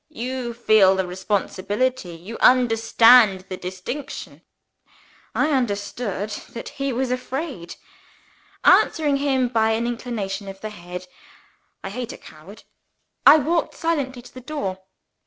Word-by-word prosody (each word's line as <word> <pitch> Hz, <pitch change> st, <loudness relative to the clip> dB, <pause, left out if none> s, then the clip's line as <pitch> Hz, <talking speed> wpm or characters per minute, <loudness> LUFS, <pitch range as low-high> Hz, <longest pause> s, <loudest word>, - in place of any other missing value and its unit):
You 250 Hz, -4 st, -5 dB
feel 215 Hz, -5 st, +5 dB
the 190 Hz, -1 st, 0 dB
responsibility? 195 Hz, +3 st, -2 dB
You 185 Hz, +8 st, -9 dB
understand 225 Hz, -4 st, +5 dB
the 185 Hz, -, -4 dB
distinction?" 185 Hz, +11 st, -7 dB, 0.9 s
I 305 Hz, -, +2 dB
understood 205 Hz, -4 st, -2 dB, 0.2 s
that 235 Hz, -, -7 dB
he 275 Hz, 0 st, -3 dB
was 255 Hz, +1 st, -1 dB
afraid. 255 Hz, -, -4 dB, 0.9 s
Answering 295 Hz, -3 st, +4 dB
him 270 Hz, -3 st, +1 dB
by 225 Hz, -2 st, +2 dB
an 230 Hz, +1 st, -1 dB
inclination 225 Hz, -5 st, -4 dB
of 195 Hz, 0 st, -8 dB
the 215 Hz, +1 st, -6 dB
head 180 Hz, -2 st, -8 dB, 0.8 s
(I 195 Hz, -, -5 dB
hate 245 Hz, +2 st, -5 dB
a -, -, -9 dB
coward!) 165 Hz, +8 st, -14 dB, 0.6 s
I -, -, +10 dB
walked 320 Hz, +3 st, 0 dB
silently 280 Hz, -7 st, -2 dB
to -, -, -15 dB
the 255 Hz, -, -10 dB
door. 205 Hz, -9 st, -4 dB
230 Hz, 125 wpm, -22 LUFS, 195-255 Hz, 0.9 s, I